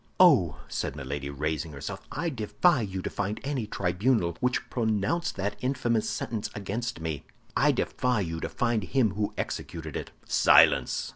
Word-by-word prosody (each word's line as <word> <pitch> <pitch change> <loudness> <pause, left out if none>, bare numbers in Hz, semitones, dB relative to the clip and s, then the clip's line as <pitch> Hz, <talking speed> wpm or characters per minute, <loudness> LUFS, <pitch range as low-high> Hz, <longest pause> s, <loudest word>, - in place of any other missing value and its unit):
"Oh," 130 - +6
said - - -3
Milady, 70 0 -4
raising 75 +2 -2
herself, 70 - -6
"I 165 +3 -1
defy 130 - +2
you 95 -3 -4
to - - -2
find 100 +2 -2
any 135 -6 -2
tribunal 90 -1 +1
which 125 0 0
pronounced 110 - 0
that 100 +1 -2
infamous 125 -4 0
sentence 110 -3 -3
against 110 +3 -3
me. 80 -3 -3 0.3
I - - +4
defy 125 -4 0
you 80 -3 -3
to - - -3
find 115 -3 0
him 115 +1 +2
who 105 +2 -2
executed 80 -3 -4
it." - - -4 0.2
"Silence!" - - +5
105 Hz, 155 wpm, -28 LUFS, 85-125 Hz, 0.3 s, Oh